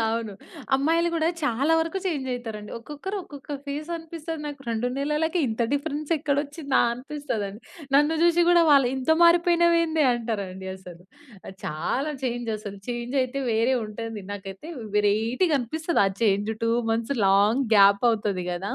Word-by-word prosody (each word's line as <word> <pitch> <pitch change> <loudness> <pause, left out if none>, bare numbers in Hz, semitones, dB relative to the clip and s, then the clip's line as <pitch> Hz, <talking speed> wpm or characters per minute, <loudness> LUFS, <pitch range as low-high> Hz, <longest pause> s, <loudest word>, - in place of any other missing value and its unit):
అవును. 225 -2 -2 0.4
అమ్మాయిలు 325 +5 +2
గూడా 325 0 +1
చాలా 280 +3 +1
వరకు 330 +4 -2
చేంజ్ 280 -7 -2
అయితారండి. 220 -4 -7
ఒక్కొక్కరు 300 - -6
ఒక్కొక్క 285 -2 -8
ఫేసనిపిస్తుంది 320 +1 -5
నాకు. 290 -1 -7
2 230 +1 -1
నెలలకే 300 +4 0
ఇంత 220 +1 -1
డిఫరెన్స్ 295 +1 -2
ఎక్కడొచ్చిందా? 285 0 0
అనిపిస్తదండి. 240 -6 -5 0.3
నన్ను 295 +3 +4
జూసి 345 0 +4
గూడా 350 -1 +6
వాళ్ళు 275 -4 +6
ఇంత 265 +3 -1
మారిపోయినవెందే 340 -2 +4
అంటారండి 200 -5 -4
అసలు. 180 -2 -13 0.4
అది 190 - -10
చాలా 250 - -2
చేంజ్ 240 -2 -2
అసలు. 205 -1 -8
చేంజయితే 255 +2 -1
వేరే 230 +4 +2
ఉంటుంది 215 0 -6
నాకైతే 195 +7 -8 0.3
వేరైటీగా 225 - +2
అనిపిస్తది 315 +6 0
ఆ - - +3
చేంజ్ 205 0 +2
2 230 - +2 0.2
మంత్స్ 230 +4 -1
లాంగ్ 205 +7 +4
గ్యాప్ 200 +2 +6
అవుతది 205 -5 -1
గదా! 180 +3 -3
265 Hz, 140 wpm, -25 LUFS, 215-310 Hz, 0.4 s, గూడా